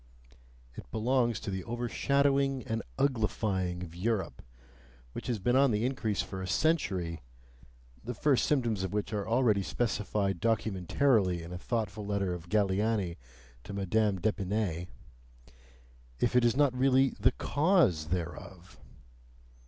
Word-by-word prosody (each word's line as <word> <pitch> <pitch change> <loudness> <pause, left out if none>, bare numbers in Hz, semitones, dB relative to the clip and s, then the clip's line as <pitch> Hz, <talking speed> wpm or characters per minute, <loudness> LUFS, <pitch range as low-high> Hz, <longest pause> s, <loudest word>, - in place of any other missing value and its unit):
It - - -10
belongs 120 0 +1
to 100 - -4
the 95 -1 -3
overshadowing 135 +3 +1
and 110 +1 -2 0.2
uglifying 105 -8 0
of 85 -2 -9
Europe, 105 +2 -2 0.7
which - - -7
has 120 - 0
been 120 +6 +1
on 135 +1 +5
the 110 0 0
increase 110 -9 -1
for 95 - -7
a 95 - -4
century 95 - 0 0.8
(the 125 +1 -5
first 140 +2 +2
symptoms 120 -9 +1
of 95 0 -3
which 105 +1 -2
are 100 -2 -2
already 115 -4 +3
specified 100 -3 -1
documentarily 105 - +1
in 85 +2 -8
a 90 - -5
thoughtful 110 -1 -3
letter 100 -2 -1
of 85 -1 -8
Galiani 100 -2 +1 0.5
to 100 - -8
Madame 100 0 +1
d'Epinay) 100 -3 -1 1.3
IF 120 0 +1
IT 125 -1 +5
IS 120 +2 +2
NOT 145 -3 +3
REALLY 130 +1 +4
THE 110 +5 +3
CAUSE 145 - +2
THEREOF! 90 +1 -6
105 Hz, 135 wpm, -30 LUFS, 95-125 Hz, 1.3 s, on